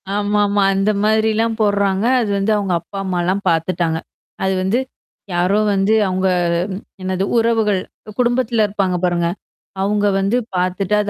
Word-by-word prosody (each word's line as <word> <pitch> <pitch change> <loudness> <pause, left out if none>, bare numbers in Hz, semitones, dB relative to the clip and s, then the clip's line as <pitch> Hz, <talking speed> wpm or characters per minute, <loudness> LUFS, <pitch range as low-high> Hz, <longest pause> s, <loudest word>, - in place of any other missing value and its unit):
ஆமாமா. 205 0 +1
அந்த 195 +2 +1
மாதிரிலாம் 220 +1 +1
போடுறாங்க. 200 -1 +1 0.2
அது 220 - -2
வந்து 195 +2 0
அவுங்க 195 -3 -1
அப்பா 200 - -10
அம்மாலாம் 185 +2 -1
பார்த்துட்டாங்க. 165 0 0 0.5
அது 190 - +1
வந்து. 200 +6 +1 0.5
யாரோ 180 +4 +2
வந்து 195 +2 +2
அவுங்க 185 0 0 0.5
ம். 190 - -6 0.2
என்னது 185 0 -1
உறவுகள், 225 -4 +2 0.3
அ - - -8
குடும்பத்தில 240 -2 +2
இருப்பாங்க 195 -3 -1
பாருங்க. 175 -1 +1 0.5
அவங்க 205 +1 +1
வந்து 200 +5 +1 0.2
பார்த்துட்டு 185 +2 -1
அது 205 - -3
200 Hz, 140 wpm, -18 LUFS, 185-215 Hz, 0.5 s, யாரோ